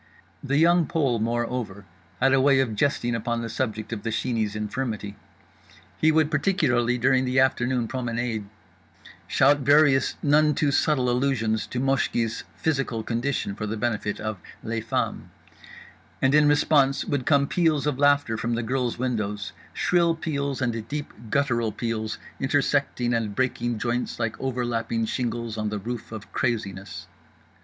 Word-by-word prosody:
The 140 0 0
Young 170 0 +4
Pole 135 -8 +1
moreover 115 -3 -2 0.3
had 135 +1 +4
a 135 - +4
way 135 0 +4
of 125 -5 +1
jesting 120 0 0
upon 115 +1 -2
the 115 - -4
subject 110 -1 -3
of 105 - -4
The 115 - -3
Sheeney's 110 -2 -1
infirmity. 105 -1 -3 0.8
He 160 - +3
would, 155 -1 +2
particularly 130 -8 +2
during 130 +1 +3
the 130 +1 +1
afternoon 125 -2 +2
promenade, 120 -3 -3 0.8
shout 145 +2 +4
various 145 -1 +4
none 150 0 +4
too 145 -2 +1
subtle 140 -3 +2
allusions 120 -3 0
to 125 - -4
Moshki's 125 -4 0
physical 135 -7 -1
condition 120 -2 -2
for 105 +2 -5
the 110 +2 -3
benefit 105 -2 -2
of 110 -2 -4 0.2
les 115 0 -2
femmes. 115 0 -2 0.9
And 135 +1 +2
in 150 0 +6
response 145 -2 +3
would 140 -4 -2
come 140 -2 +4
peals 155 -2 +1
of 145 -3 -1
laughter 145 -5 +3
from 115 +2 -1
the 115 - -2
girls' 125 +1 -1
windows, 105 -5 -2 0.2
shrill 170 -2 +2
peals 140 -4 -2
and 115 -2 -2
deep 145 +3 -5 0.2
guttural 120 -4 +1
peals 110 -1 -3 0.2
intersecting 135 -3 +1
and 110 -3 -1
breaking 120 -2 -1
joints 120 +2 -2
like 115 -2 -1
overlapping 120 -3 -1
shingles 115 -2 -3
on 105 0 -1
the 105 - -3
roof 115 +3 -6
of 110 -2 -9
Craziness. 100 -4 -3
125 Hz, 150 wpm, -25 LUFS, 115-140 Hz, 0.9 s, in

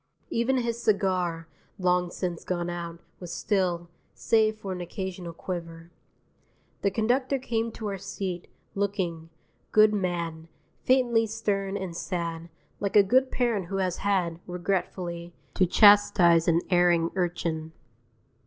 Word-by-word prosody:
Even 240 +3 +1
his 235 -1 -2
cigar 185 -6 0 0.3
(long 180 -2 +1
since 175 -2 -4
gone 175 -1 -2
out) 170 -1 -6 0.2
was 175 -2 -7
still, 180 -4 0 0.3
save 220 -1 +2
for 195 -3 -6
an 180 -1 -4
occasional 180 -1 -5
quiver. 165 -1 -7 0.9
The 200 - +2
conductor 250 +7 +1
came 230 -3 -2
to 220 - -7
our 195 -1 -4
seat, 185 -2 -5 0.3
looking, 185 -5 -2 0.4
good 215 0 +6
man, 170 -4 -2 0.3
faintly 240 -3 +3
stern 200 -3 -2
and 190 -4 -5
sad, 170 -2 -4 0.3
like 200 -1 -2
a 205 - +8
good 255 +6 +3
parent 230 -9 0
who 195 +2 -3
has 185 -2 0
had, 180 -5 0
regretfully, 175 -1 -3 0.2
to 185 - +3
chastise 185 -4 +6
an 170 0 +4
erring 175 -2 +3
urchin. 170 -3 -2
185 Hz, 130 wpm, -27 LUFS, 170-205 Hz, 0.9 s, a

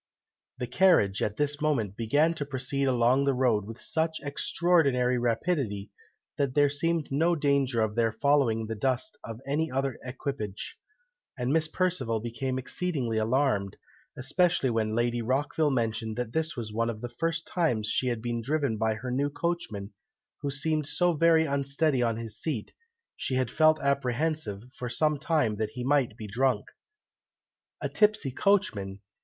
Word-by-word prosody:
'" - - -65
The 125 - -3
carriage, 120 - +3
at 105 0 -1
this 145 0 0
moment, 120 -11 0
began 145 +9 +2
to 155 - -3
proceed 135 0 -1
along 130 +1 +3
the 140 -2 +2
road 120 -6 +2
with 115 +2 -9
such 160 0 -1
extraordinary 140 -4 +2
rapidity, 115 - -1 0.5
that 140 -3 0
there 145 -1 +4
seemed 165 +1 -1
no 165 +5 +2
danger 140 -5 +1
of 110 -1 -1
their 115 0 +2
following 125 -1 +2
in - - -4
the 110 - -4
dust 130 - -1
of 115 0 -7
any 150 +4 0
other 135 -1 -2
equipage, 125 -6 -5 0.6
and 125 +2 0
Miss 160 -1 +2
Perceval 155 -11 0
became 120 +3 -3
exceedingly 130 -5 -2
alarmed, 110 -4 +1 0.4
especially 140 0 +2
when 110 -1 0
Lady 120 0 +1
Rockville 145 +5 +1
mentioned 110 -4 -1
that 120 -1 -4
this 160 -1 -1
was 110 -3 -5
one 115 +1 0
of 110 -2 -5
the 120 - -4
first 165 0 -1
times 120 -12 0
she 130 +4 0
had 120 -2 -2
been 120 -1 -2
driven 140 -2 0
by 110 0 +1
her 125 +3 -5
new 140 +3 +1
coachman, 145 -12 -3 0.5
who 140 - -2
seemed 150 +2 0
so 175 +2 +2
very 160 0 +4
unsteady 140 0 +1
on 115 -2 +1
his 115 -2 -5
seat, 145 -10 -3 0.4
she 130 - -2
had 130 -2 0
felt 155 0 +4
apprehensive, 140 -4 -1
for 125 - -5
some 150 +4 +1
time, 145 -9 +1
that 110 0 -1
he 125 - -5
might 130 -4 +1
be 110 - -7
drunk. 125 +6 0 1.2
"A - - -1
tipsy 210 -10 +2
coachman! 125 - +1
130 Hz, 165 wpm, -28 LUFS, 115-155 Hz, 1.2 s, there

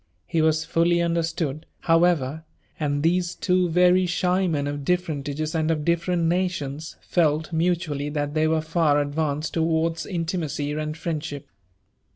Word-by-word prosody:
He 165 -2 0
was 155 0 +2
fully 170 +1 +2
understood, 165 -3 -1
however; 165 -3 +2 0.4
and 145 -1 -1
these 175 +1 +1
two 180 -1 +1
very 180 +2 +4
shy 180 +1 +1
men, 145 -4 -1
oC 145 0 -3
differentages 155 -3 -1
and 160 -1 0
of 155 -2 0
different 170 +1 +1
nations, 165 -4 -1
felt 155 -1 +1
mutually 160 -4 0
that 145 -1 -2
they 155 0 +2
werfi 160 0 +1
far 160 -2 +2
advanced 145 +1 -1
towards 165 0 0
iptimacy 165 -5 -2
and 155 0 -3
friendship. 155 -4 -4
160 Hz, 140 wpm, -24 LUFS, 150-175 Hz, 0.4 s, very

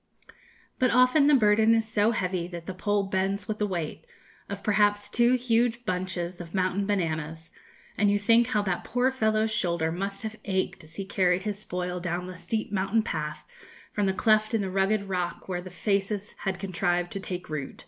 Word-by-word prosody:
"But 255 - +4
often 255 +4 +5
the 295 - +6
burden 220 -1 +5
is 225 -1 +1
so 215 0 +2
heavy 185 -6 -1
that 170 -2 -8
the 190 - -5
pole 205 +2 0
bends 195 +1 -1
with 215 -1 -3
the 210 - +1
weight 175 - -4 0.4
of 200 0 -6
perhaps 205 0 +2
two 240 +1 +3
huge 240 -1 +1
bunches 180 -2 -3
of 170 +2 -9
mountain 185 +1 0
bananas, 160 -4 -2 0.5
and 205 0 +4
you 205 - +3
think 230 +3 +4
how 215 -4 +1
that 185 -3 -2
poor 250 +2 +1
fellow's 220 -3 +1
shoulder 170 -4 0
must 195 +4 -3
have 220 0 -5
ached 190 -2 -2
as 155 - -11
he 195 - -4
carried 185 -1 +1
his 205 -1 -2
spoil 180 -3 -3
down 175 0 -3
the 185 0 -7
steep 190 +5 -3
mountain 200 +3 +1
path 150 -6 -4 0.5
from 205 -1 +1
the 190 - +1
cleft 215 +3 +3
in 220 - +1
the 190 -1 -3
rugged 195 +2 +1
rock 180 -2 -3
where 180 -2 -2
the 185 - -9
faces 200 +2 -1
had 195 -2 -2
contrived 175 -2 -1
to 195 - -4
take 185 -1 -6
root. 150 -3 -5
195 Hz, 195 wpm, -27 LUFS, 180-215 Hz, 0.5 s, the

